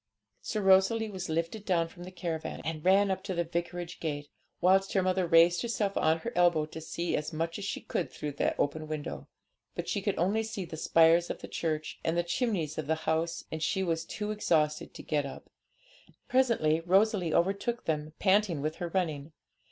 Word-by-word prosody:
So 215 - -2
Rosalie 195 +3 +4
was 185 -3 -5
lifted 165 +6 -2
down 170 -4 +1
from 175 +1 -11
the 185 - -9
caravan, 170 -3 -4
and 155 -1 -3
ran 195 +2 +4
up 190 - -2
to 190 -2 -3
the 170 - +1
vicarage 175 +1 -4
gate, 145 -2 -4 0.3
whilst 190 +2 +3
her 190 - +3
mother 185 -1 +1
raised 170 +1 +5
herself 215 -4 -1
on 160 +1 +3
her 235 - -4
elbow 170 -3 +4
to 160 +1 -9
see 170 +2 -2
as 150 +2 -2
much 165 +3 -3
as 200 - -5
she - - -3
could 175 - -2
through 150 - -5
the 140 - -1
open 155 +2 -1
window. 155 -1 -5 0.5
But - - -4
she - - -1
could - - -1
only 195 +6 +2
see 220 -4 -4
the 165 - -7
spire 165 +1 +5
of - - -5
the - - -7
church 155 -2 -3
and 165 +1 0
the 175 - +2
chimneys 170 - -1
of 155 - -4
the 160 - +2
house, 160 +1 0
and 160 - -4
she 190 +4 0
was 165 -2 -1
too 210 +5 -4
exhausted 155 -7 0
to - - -8
get 145 -2 0
up. - - -11 0.8
Presently 230 -12 +3
Rosalie 185 0 +2
overtook 200 +7 0
them, 155 -1 -2
panting 195 -4 +3
with 155 +3 -3
her 175 - -3
running. 160 -4 -2
170 Hz, 200 wpm, -30 LUFS, 160-195 Hz, 0.8 s, raised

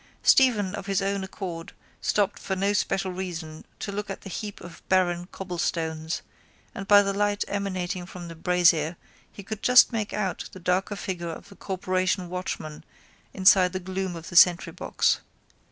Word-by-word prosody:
Stephen 215 -8 +4
of 200 -1 -6
his 195 -1 +1
own 195 0 -1
accord 185 -1 -6 0.3
stopped 205 -1 +1
for 190 - -3
no 200 +2 +1
special 195 -2 0
reason 170 -4 -6
to 200 - -5
look 205 +1 -4
at 195 - -6
the 195 - -9
heap 205 +2 -5
of 170 -1 -11
barren 175 -2 +2
cobblestones 165 -3 -3 0.5
and 195 - -7
by 205 0 +7
the 200 0 -1
light 205 0 0
emanating 185 -3 -3
from 180 -1 -9
the 165 - -8
brazier 170 -1 +2 0.3
he 200 - -10
could 215 +2 -6
just 250 +1 +7
make 220 -3 -2
out 195 -3 -3
the 185 - -9
darker 185 +3 0
figure 175 -4 -4
of 165 +4 -8
the 200 - -14
corporation 185 -1 -1
watchman 155 -4 -5 0.5
inside 185 -1 +5
the 185 - -2
gloom 190 0 -4
of 165 0 -8
the - - -9
sentrybox. 175 +1 +4
185 Hz, 170 wpm, -26 LUFS, 175-200 Hz, 0.5 s, by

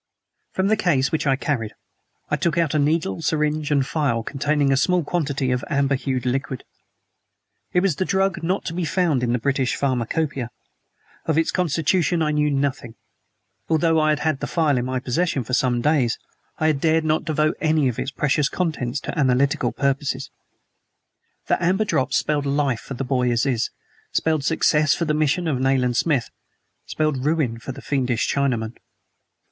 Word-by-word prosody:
From 190 - 0
the 215 - +4
case 145 -10 +1
which 155 -1 -1
I 135 - +4
carried 130 -6 -2 0.6
I - - +3
took 170 -1 -1
out 165 -3 +1
a 155 - +2
needle 160 +4 0
syringe 150 -1 0
and 140 -2 +3
a - - -7
phial 140 -6 0
containing 145 +2 0
a - - +3
small 175 +6 +2
quantity 140 -5 -1
of 125 +1 -1
amber 140 -1 +1
hued 130 -2 -2
liquid. 130 0 -2 1.1
It 180 - +3
was 190 -4 0
a - - +3
drug 190 -1 0
not 180 +4 -1
to 165 - -3
be 180 +1 -2
found 165 -5 +1
in 120 -1 0
the 125 - +2
British 130 +1 0
Pharmacopoeia. 135 0 -1 0.8
Of 160 -1 +1
its 165 - +2
constitution 170 0 +1
I 150 - +1
knew 150 0 +2
nothing. 135 -5 -2 0.7
Although 165 0 +3
I 155 0 +3
had 150 -1 +1
had 155 -3 0
the - - -3
phial 150 -6 +1
in 120 - -2
my 130 0 -1
possession 135 +2 -1
for 125 - -7
some 125 -1 +2
days 135 -4 +2 0.4
I 155 - -1
had 155 -2 +3
not - - -11
dared 160 0 +2
to 155 0 +2
devote 155 0 +1
any 155 -3 +2
of 125 - -2
its - - -2
precious 145 +1 +1
contents 145 -7 -2
to - - -5
analytical 135 -2 +2
purposes. 140 +1 -1 1.1
The - - 0
amber 190 +5 +2
drops 135 -8 +1
spelled 145 -2 0
life 140 -4 0
for 135 - -7
the 135 - -3
boy 125 -2 +1
Aziz, 120 0 +1 0.4
spelled 155 -3 +1
success 155 -1 +3
for 170 - -1
the 155 - 0
mission 155 +3 +1
of 140 -5 0
Nayland 130 -2 +2
Smith, 135 -2 +1 0.6
spelled 155 -4 -1
ruin 145 -7 0
for 130 - -6
the - - -10
fiendish 125 -4 0
Chinaman. 120 -5 -1
145 Hz, 185 wpm, -22 LUFS, 130-160 Hz, 1.1 s, the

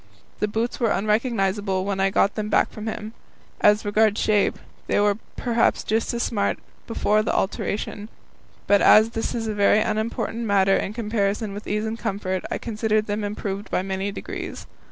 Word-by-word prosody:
The 210 - +1
boots 225 +3 -2
were 235 -3 +2
unrecognizable 205 -3 0
when 200 -1 -2
I 195 0 +3
got 195 +1 +2
them 215 -1 -3
back - - +2
from 215 0 -7
him. 220 0 -5 0.5
As 210 +1 +4
regards 215 0 +2
shape, 210 -2 +2 0.3
they - - +2
were 205 0 +2 0.2
perhaps 235 -2 +1
just 225 +1 0
as 235 - 0
smart 200 -3 0 0.3
before 215 -2 +2
the 215 - -1
alteration, 205 +2 -2 0.6
but 200 -1 +4
as 220 +1 +6
that 225 +1 -3
is 230 -1 -2
a 215 - -2
very 205 0 +4
unimportant 220 +1 -2
matter 195 -2 +3
in 205 - -2
comparison 210 -2 -1
with 205 +1 -8
ease 210 +1 -1
and 220 +1 -4
comfort, 190 -4 -2
I - - -2
considered 215 -1 0
them 210 0 -2
improved 205 0 -4
by 180 - 0
many 195 +1 -2
degrees. - - -6
210 Hz, 175 wpm, -23 LUFS, 200-220 Hz, 0.6 s, as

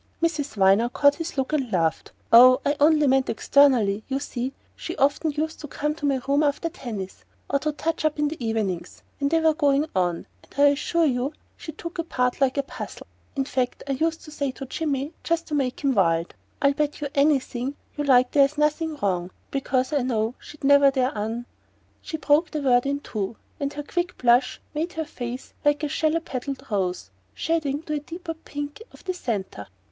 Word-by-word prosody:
Miss 335 -1 +1 0.2
Viner 195 +5 +4
caught 285 +3 +4
his 330 0 -6
look 265 +3 -1
and 270 -6 0
laughed. 165 -3 0 0.2
"Oh, 255 +2 +9
I 285 - +2
only 300 0 +5
meant 265 -1 +3
externally! 230 -4 +3
You 270 0 -1
see, 255 -2 -4 0.2
she - - -6
often 285 +3 +2
used 310 +2 -3
to 300 - -7
come 295 +2 -2
to 300 -2 -3
my 270 -2 +1
room 280 +2 +3
after 300 +3 0
tennis, 215 - -7 0.2
or 280 - +1
to 305 +2 -1
touch 320 +2 -2
up 310 -1 +1
in 295 0 +2
the 295 -4 -5
evenings, 200 -6 -2 0.2
when 280 0 +1
they 325 +1 +3
were 320 -1 +4
going 290 -2 +2
on; 175 -2 0 0.2
and - - -22
I 285 0 +7
assure 320 +4 +1
you 265 +1 0 0.2
she 320 - -8
took 335 +3 -8
apart 250 -6 -1
like 270 0 +2
a 280 - +2
puzzle. - - -8 0.3
In 270 -1 0
fact 255 -2 -2
I - - -1
used 320 +4 -1
to 305 - -11
say 285 -2 -2
to 270 - -7
Jimmy 285 +1 -2
just 335 0 0
to - - -5
make 270 -1 -1
him 275 -1 +3
wild: 165 -5 +2 0.3
'I'll 280 0 +5
bet 295 0 -1
you 295 - -2
anything 275 -2 +1 0.2
you 295 - -2
like 255 -3 +4
there's 285 +1 +4
nothing 300 +1 +1
wrong, 180 -3 0 0.2
because 265 0 0
I 285 - +2
know 230 -2 0
she'd 300 - -13
never 280 0 +6
dare 260 -2 0
un 225 +3 -3 0.3
'" - - -38
She 315 - -5
broke 305 +2 +3
the 300 -2 -3
word 245 -1 +3
in 280 +1 -1
two, 210 -3 -4 0.2
and 280 0 -1
her 295 - -5
quick 350 +4 -3
blush 245 +1 +3
made 325 +4 -2
her 320 -1 -3
face 245 -2 -7
like 290 +1 +2
a - - +1
shallow 315 +3 +1
petalled 270 -2 -5
rose 180 - -1 0.2
shading 310 -3 -1
to 305 - -4
the 300 - 0
deeper 330 +3 -6
pink 290 +2 -7
of - - -16
the 370 - -2
centre. 200 - -4
280 Hz, 205 wpm, -25 LUFS, 245-300 Hz, 0.3 s, Oh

